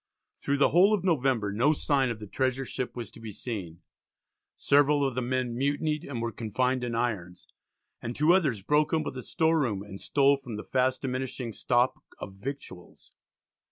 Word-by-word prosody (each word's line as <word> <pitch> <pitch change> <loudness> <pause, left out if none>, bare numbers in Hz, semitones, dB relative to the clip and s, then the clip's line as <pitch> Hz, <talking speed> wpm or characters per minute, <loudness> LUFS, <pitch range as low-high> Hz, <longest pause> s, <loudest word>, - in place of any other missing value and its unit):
Through 140 - 0
the 140 - +4
whole 195 +5 +5
of 190 - -5
November 130 - +1
no 125 +9 +3
sign 140 -3 +1
of 115 -2 -4
the 105 - -7
treasure 130 +5 -1
ship 125 0 -4
was 120 -4 -6
to - - -13
be 110 -1 -7
seen; 95 -7 -6 0.7
several 145 0 +3
of 135 - -3
the 130 - -1
men 125 -1 -1
mutinied 145 +3 0
and 120 -5 -4
were 115 - -2
confined 125 +4 -1
in 120 -1 -2
irons, 100 -7 -3 0.5
and 120 +1 -5
two 155 +4 +4
others 140 - +1
broke 150 - +2
open 155 -4 0
the 130 - -6
store 160 +5 +1
room 105 -9 -1
and 100 -1 -10
stole 140 0 +3
from 125 -5 -8
the 105 - -6
fast 130 +1 0
diminishing 130 -2 -3
stock 120 +3 +1 0.2
of 95 - -8
victuals. 100 -4 -8
130 Hz, 185 wpm, -28 LUFS, 115-140 Hz, 0.7 s, whole